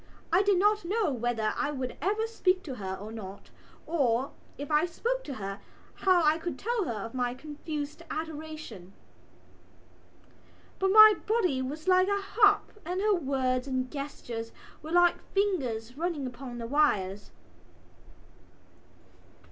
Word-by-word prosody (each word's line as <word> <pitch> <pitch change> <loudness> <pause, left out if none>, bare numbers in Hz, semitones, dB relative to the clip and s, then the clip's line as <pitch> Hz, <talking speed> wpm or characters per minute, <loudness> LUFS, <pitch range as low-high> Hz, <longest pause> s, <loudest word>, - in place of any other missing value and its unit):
I 360 - +6
did 400 -2 +3
not 415 +2 +3
know 395 -1 0
whether 235 -3 -1
I 290 - -1
would 260 -4 -4
ever 425 +3 +1
speak 380 -5 +1
to 275 - -6
her 190 -2 -4
or 205 +3 -8
not 200 -3 -9 0.3
or, 270 -5 +1 0.3
if 285 +2 -6
I 300 +3 +3
spoke - - -2
to 275 - -5
her, 195 -2 -5 0.3
how 370 -3 +3
I 310 +1 +3
could 330 -4 -4
tell 460 - -1
her 215 -6 -3
of 230 - -9
my 245 -1 -1
confused 300 +2 -6
adoration. 310 - -6 1.9
But 385 - +2
my 430 +2 +10
body 380 - +1
was 295 +6 -5
like 370 0 +5
a 400 0 +1
harp 410 +1 +2
and 360 +3 -3
her 420 +1 +3
words 265 -5 0
and 255 -1 -2
gestures 240 -5 -6 0.3
were 310 +1 -8
like 350 0 +4
fingers 255 - 0
running 325 -3 -2
upon 245 0 -7
the 230 - -5
wires. 205 -8 +1
300 Hz, 145 wpm, -29 LUFS, 245-370 Hz, 1.9 s, my